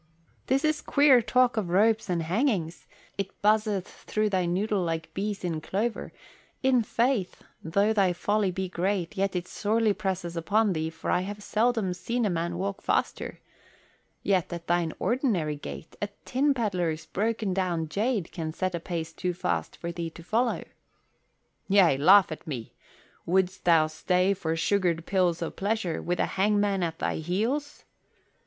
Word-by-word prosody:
"This 270 Hz, +4 st, +2 dB
is 310 Hz, -1 st, +1 dB
queer 280 Hz, -4 st, +5 dB
talk 250 Hz, +1 st, +2 dB
of 200 Hz, -5 st, -1 dB
ropes 215 Hz, +3 st, +3 dB
and 170 Hz, -2 st, 0 dB
hangings. 180 Hz, -, -1 dB, 0.3 s
It 195 Hz, 0 st, -4 dB
buzzeth 210 Hz, -2 st, +2 dB
through 215 Hz, -1 st, -2 dB
thy 185 Hz, -2 st, +1 dB
noddle 195 Hz, +3 st, 0 dB
like 165 Hz, -2 st, -3 dB
bees 200 Hz, 0 st, -3 dB
in 165 Hz, -3 st, -2 dB
clover. 220 Hz, +8 st, -2 dB, 0.5 s
In 260 Hz, -2 st, +4 dB
faith, 230 Hz, -3 st, 0 dB, 0.2 s
though 200 Hz, +7 st, +2 dB
thy 195 Hz, -4 st, +3 dB
folly 205 Hz, +3 st, 0 dB
be 190 Hz, +1 st, -3 dB
great, 185 Hz, +1 st, -1 dB
yet 195 Hz, -1 st, 0 dB
it 180 Hz, 0 st, -2 dB
sorely 215 Hz, +1 st, +1 dB
presses 190 Hz, -4 st, -3 dB
upon 205 Hz, +5 st, +2 dB
thee, 160 Hz, -1 st, -2 dB
for 160 Hz, -, -4 dB
I 180 Hz, -, +2 dB
have 205 Hz, +2 st, -6 dB
seldom 220 Hz, -4 st, +1 dB
seen 235 Hz, +6 st, -2 dB
a 205 Hz, -, +1 dB
man 170 Hz, 0 st, -2 dB
walk 195 Hz, +2 st, -3 dB
faster. -, -, -1 dB, 0.8 s
Yet 190 Hz, -4 st, +1 dB
at 170 Hz, -1 st, -6 dB
thine 175 Hz, -1 st, +1 dB
ordinary 215 Hz, -, 0 dB
gait 145 Hz, +2 st, -9 dB
a 205 Hz, -, -1 dB, 0.2 s
tin 275 Hz, +2 st, +2 dB
pedlar's 175 Hz, -9 st, -1 dB
broken 215 Hz, -1 st, -1 dB
down 175 Hz, -4 st, -1 dB
jade 205 Hz, +2 st, -1 dB
can 160 Hz, -3 st, -4 dB
set 185 Hz, +2 st, -2 dB
a 170 Hz, -, -2 dB
pace 165 Hz, -1 st, -4 dB
too 180 Hz, -1 st, -2 dB
fast -, -, -2 dB
for 170 Hz, -, -4 dB
thee 170 Hz, -1 st, -4 dB
to 165 Hz, +1 st, -13 dB
follow." 230 Hz, +7 st, 0 dB, 1.0 s
"Yea, 190 Hz, -7 st, +5 dB
laugh 180 Hz, +7 st, +6 dB
at 155 Hz, -, -7 dB
me! 125 Hz, -7 st, -5 dB, 0.5 s
Wouldst 185 Hz, +1 st, +1 dB
thou 165 Hz, -3 st, +5 dB
stay 180 Hz, +5 st, +1 dB
for 165 Hz, -4 st, -2 dB
sugared 170 Hz, -1 st, +1 dB
pills 180 Hz, -3 st, +1 dB
of 165 Hz, -, -5 dB
pleasure 200 Hz, -4 st, -1 dB
with 175 Hz, +1 st, -1 dB
the -, -, +2 dB
hangman 205 Hz, 0 st, +1 dB
at 165 Hz, -2 st, -2 dB
thy -, -, -1 dB
heels?" 220 Hz, -, -2 dB
190 Hz, 165 wpm, -27 LUFS, 170-215 Hz, 1.0 s, laugh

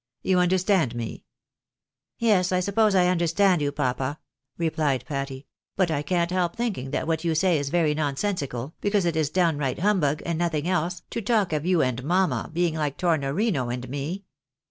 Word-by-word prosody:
You 185 Hz, -1 st, +3 dB
understand 180 Hz, -, +2 dB
me? 115 Hz, -1 st, -6 dB, 0.3 s
" -, -, -66 dB
" -, -, -65 dB
Yes, 200 Hz, -6 st, +2 dB
I 185 Hz, -, +2 dB
suppose 200 Hz, +2 st, +2 dB
I 180 Hz, -1 st, +5 dB
understand 180 Hz, 0 st, +2 dB
you, 145 Hz, -1 st, 0 dB
papa," 135 Hz, 0 st, -2 dB, 0.4 s
replied 155 Hz, -5 st, 0 dB
Patty, 135 Hz, -2 st, -4 dB, 0.2 s
" -, -, -69 dB
but 185 Hz, -4 st, +2 dB
I 145 Hz, -2 st, 0 dB
can't 170 Hz, +3 st, 0 dB
help 180 Hz, +1 st, 0 dB
thinking 220 Hz, -, -2 dB
that -, -, -2 dB
what 160 Hz, 0 st, -1 dB
you 165 Hz, -2 st, 0 dB
say 175 Hz, -1 st, +3 dB
is 140 Hz, -1 st, -3 dB
very 160 Hz, -1 st, +2 dB
nonsensical, 145 Hz, -, -2 dB
because 205 Hz, -2 st, +1 dB
it 170 Hz, -2 st, 0 dB
is 155 Hz, -3 st, +1 dB
downright 150 Hz, -6 st, +1 dB
humbug, 170 Hz, -7 st, +1 dB
and 170 Hz, -1 st, -2 dB
nothing 165 Hz, -2 st, -1 dB
else, 180 Hz, -1 st, -1 dB
to 230 Hz, -, -3 dB
talk 210 Hz, -5 st, +1 dB
of 155 Hz, +2 st, -1 dB
you 180 Hz, -3 st, +3 dB
and 130 Hz, -1 st, -2 dB
mamma 180 Hz, +5 st, +1 dB
being 170 Hz, 0 st, +1 dB
like 150 Hz, -3 st, -2 dB
Tornorino 160 Hz, -, 0 dB
and 125 Hz, +1 st, -4 dB
me. 145 Hz, +9 st, -4 dB
165 Hz, 190 wpm, -25 LUFS, 145-185 Hz, 0.4 s, I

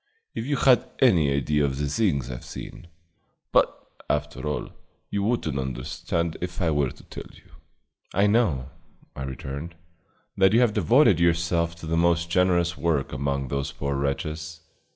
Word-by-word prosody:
If 115 Hz, -, -4 dB
you 145 Hz, -, +1 dB
had 130 Hz, -2 st, +4 dB
any 85 Hz, -, +4 dB
idea 70 Hz, +2 st, +1 dB
of 70 Hz, -2 st, 0 dB
the 75 Hz, +1 st, -1 dB
things 70 Hz, -, 0 dB
I've -, -, -7 dB
seen -, -, -9 dB, 0.6 s
But, -, -, +5 dB, 0.4 s
after 65 Hz, +4 st, -2 dB
all, 75 Hz, -, -3 dB, 0.4 s
you 100 Hz, -, 0 dB
would 115 Hz, +4 st, 0 dB
n't 70 Hz, -, -2 dB
understand 80 Hz, +6 st, -3 dB
if 90 Hz, 0 st, -4 dB
I 85 Hz, -4 st, +2 dB
were 75 Hz, -3 st, +1 dB
to -, -, -14 dB
tell -, -, -9 dB
you." -, -, -20 dB, 0.6 s
"I 100 Hz, +2 st, +3 dB
know," 95 Hz, -, +2 dB, 0.4 s
I -, -, -7 dB
returned, 70 Hz, +5 st, -6 dB, 0.6 s
"that 95 Hz, +1 st, +5 dB
you 115 Hz, -, +6 dB
have 120 Hz, -4 st, +3 dB
devoted 105 Hz, -, +4 dB
yourself 85 Hz, 0 st, +1 dB
to 85 Hz, -, -10 dB
the 80 Hz, +1 st, 0 dB
most 85 Hz, 0 st, +2 dB
generous 90 Hz, -1 st, +2 dB
work 75 Hz, -3 st, 0 dB
among 70 Hz, 0 st, -2 dB
those 70 Hz, 0 st, -2 dB
poor 70 Hz, 0 st, -3 dB
wretches." 75 Hz, +3 st, -3 dB
80 Hz, 165 wpm, -25 LUFS, 70-90 Hz, 0.6 s, you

